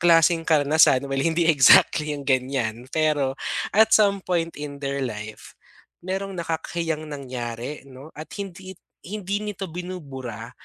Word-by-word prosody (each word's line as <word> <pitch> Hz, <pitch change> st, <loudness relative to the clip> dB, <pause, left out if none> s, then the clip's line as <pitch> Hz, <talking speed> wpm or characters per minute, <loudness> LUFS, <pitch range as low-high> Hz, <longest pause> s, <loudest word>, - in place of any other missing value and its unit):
klaseng 165 Hz, -1 st, +4 dB
karanasan, 145 Hz, -3 st, +4 dB
well 135 Hz, -, -1 dB
hindi 165 Hz, +3 st, +1 dB
exactly 150 Hz, +1 st, +5 dB
yung 140 Hz, -, -7 dB
gan'yan 130 Hz, -3 st, -1 dB
pero 150 Hz, -4 st, +1 dB, 0.4 s
at 220 Hz, +1 st, +5 dB
some 200 Hz, -2 st, +4 dB
point 170 Hz, -2 st, -1 dB
in 145 Hz, -1 st, -6 dB
their 140 Hz, 0 st, -2 dB
life 105 Hz, -2 st, -7 dB, 0.5 s
merong 190 Hz, +2 st, -4 dB
nakakahiyang 165 Hz, -1 st, -3 dB
nangyari 125 Hz, -1 st, -6 dB
'no, 135 Hz, +4 st, -12 dB
at 155 Hz, +1 st, -8 dB
hindi 190 Hz, -1 st, -7 dB, 0.3 s
hindi 200 Hz, 0 st, -3 dB
nito 205 Hz, -2 st, -5 dB
binubura 135 Hz, -10 st, -7 dB
155 Hz, 130 wpm, -24 LUFS, 135-175 Hz, 0.5 s, exactly